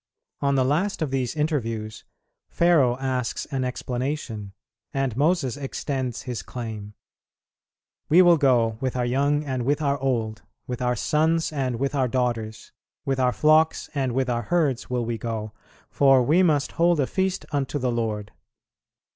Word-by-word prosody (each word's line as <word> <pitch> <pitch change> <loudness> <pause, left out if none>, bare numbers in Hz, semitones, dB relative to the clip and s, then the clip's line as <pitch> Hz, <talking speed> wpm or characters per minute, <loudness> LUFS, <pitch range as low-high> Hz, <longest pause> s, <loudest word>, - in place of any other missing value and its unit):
On 140 -1 +1
the 130 -1 +3
last 160 +7 0
of 145 - -3
these 130 +1 -1
interviews, 115 -8 -2 0.4
Pharaoh 150 -8 +3
asks 130 -2 -2
an 135 -2 -1
explanation, 125 -4 -4 0.4
and 135 -4 0
Moses 145 -2 +1
extends 135 -3 -3
his 120 -6 -4
claim: 105 -1 -7 1.1
"We 175 +4 +7
will 175 -1 +6
go 120 -5 +2
with 130 -1 -2
our 125 -1 0
young 140 +4 +1
and 130 -3 -2
with 145 +4 +1
our 140 -2 0
old, 115 -5 -1 0.2
with 125 0 -5
our 125 0 +1
sons 160 +5 +1
and 130 -4 -1
with 135 +4 -2
our 135 -3 +1
daughters, 115 -3 -2 0.3
with 135 -1 -1
our 125 -1 +3
flocks 155 +3 +3
and 135 -4 -1
with 130 +1 0
our 120 -1 0
herds 140 -1 0
will 125 -2 -1
we 115 -1 -3
go, 110 -1 -4 0.4
for 135 -2 +5
we 155 +9 +4
must 150 -6 +2
hold 170 -1 +2
a 140 - +3
feast 190 +5 -1
unto 145 0 -1
the 125 -3 0
Lord." 110 -3 -2
130 Hz, 160 wpm, -24 LUFS, 120-145 Hz, 1.1 s, We